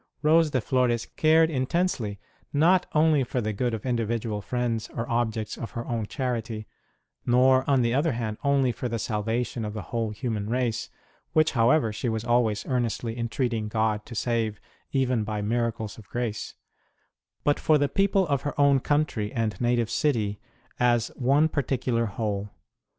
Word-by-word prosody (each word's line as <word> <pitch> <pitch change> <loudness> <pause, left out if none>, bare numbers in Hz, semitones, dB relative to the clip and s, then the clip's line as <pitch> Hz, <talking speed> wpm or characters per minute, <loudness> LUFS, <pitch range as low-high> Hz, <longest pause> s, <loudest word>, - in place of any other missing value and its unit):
Rose 160 +1 +5
de 130 - +1
Flores 120 -1 +1
cared 160 +1 +4
intensely 130 - -1 0.3
not 175 +5 +3
only 155 -2 +4
for 125 +1 -2
the 110 -2 -2
good 120 +2 -1
of 110 - -8
individual 115 -3 -1
friends 115 +1 -2
or 115 +1 -3
objects 115 -2 -1
of 115 - -5
her 115 - -3
own 115 -4 -2
charity, 115 -5 -3 0.6
nor, 130 +2 +4
on 135 -3 +4
the 115 0 +1
other 145 +3 +2
hand, 110 -2 -3
only 140 -3 +3
for 125 +1 -4
the 115 - -2
salvation 115 +2 -2
of 105 0 -4
the 105 - -4
whole 115 -2 0
human 105 -1 -3
race 120 -2 -1 0.4
(which, 155 0 +4
however, 115 -1 +3
she 120 +3 -2
was 110 0 -2
always 120 -3 +1
earnestly 120 -3 -1
entreating 115 -1 -1
God 110 -1 0
to 115 - -8
save, 115 -2 -1 0.3
even 130 -4 +1
by 105 0 -3
miracles 115 -1 -2
of 105 - -15
grace), 120 -3 -3 0.9
but 145 - +2
for 155 - +4
the 145 0 +2
people 195 +4 +2
of 140 -4 0
her 145 0 -4
own 140 -1 +5
country 140 -7 0
and 115 -4 -2
native 120 -2 +1
city 110 -8 0 0.4
as 120 -1 +2
one 140 +5 +2
particular 125 -5 0
whole. 105 -1 -3
120 Hz, 165 wpm, -26 LUFS, 110-135 Hz, 0.9 s, Rose